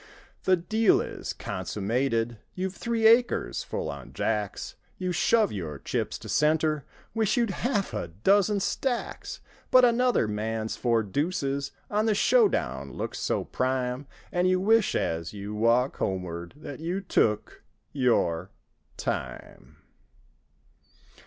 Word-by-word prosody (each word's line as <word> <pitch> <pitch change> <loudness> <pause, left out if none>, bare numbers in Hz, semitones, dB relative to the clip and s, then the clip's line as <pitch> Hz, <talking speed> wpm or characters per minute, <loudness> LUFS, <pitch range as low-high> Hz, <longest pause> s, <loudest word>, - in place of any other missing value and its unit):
The 185 -1 +5
deal 215 +5 +3
is - - -4
consummated. 115 +2 -2 0.2
You've 185 0 -2
three 230 +1 -1
acres 230 - +4
full - - -4
on 70 -3 -7
jacks; 105 -3 -2 0.2
You 185 -1 -2
shove 215 +5 +3
your 80 -7 -5
chips - - -2
to - - -11
center. 155 -1 +2 0.3
Wish 225 +2 +1
you'd 235 -4 +2
half 205 -1 -1
a - - -3
dozen 195 - +2
stacks; 245 +4 -2 0.3
But 255 -1 +7
another 245 - +3
man's 110 +1 -2
four 115 -2 +1
deuces 140 - -1 0.2
On 210 +2 +2
the 215 - +3
"show 465 - +5
down" - - -3
looks - - -4
so - - 0
prime. 130 +1 -1 0.2
And 180 +1 +2
you 185 0 +3
wish, 220 +2 +3
as 80 +1 -1
you 100 +1 -6
walk 115 +4 +2
homeward. 90 0 -3
That—you—took—your—time. 130 - -1
140 Hz, 120 wpm, -27 LUFS, -, 0.3 s, But